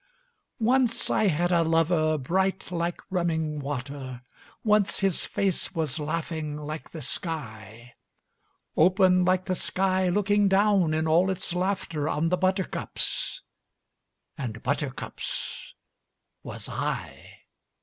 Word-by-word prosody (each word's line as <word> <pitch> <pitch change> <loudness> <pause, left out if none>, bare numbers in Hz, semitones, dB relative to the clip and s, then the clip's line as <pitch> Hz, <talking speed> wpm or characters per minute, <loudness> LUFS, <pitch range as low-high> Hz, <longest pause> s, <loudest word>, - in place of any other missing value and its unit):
Once 240 +1 +2
I 215 - +3
had 175 +1 +1
a 170 -1 +4
lover 165 -1 +2
bright 190 +7 0
like 170 0 -2
running 160 -4 0
water, 135 -2 -5 0.4
Once 210 -2 +3
his 195 -3 +1
face 195 -1 -1
was 155 -2 0
laughing 155 -1 -3
like 150 +1 -6
the 160 -3 -6
sky; 120 - -6 0.8
Open 185 +2 +5
like 185 0 +2
the 185 - 0
sky 185 0 +1
looking 205 +2 +3
down 195 -4 +3
in 160 0 0
all 170 +4 +4
its 185 -2 -3
laughter 180 -5 -1
On 165 +2 +1
the 180 - +2
buttercups 185 0 -1 1.0
and 115 -5 -5
buttercups 140 0 -3 0.7
was - - -6
I. - - -5
170 Hz, 115 wpm, -27 LUFS, 150-190 Hz, 1.0 s, Open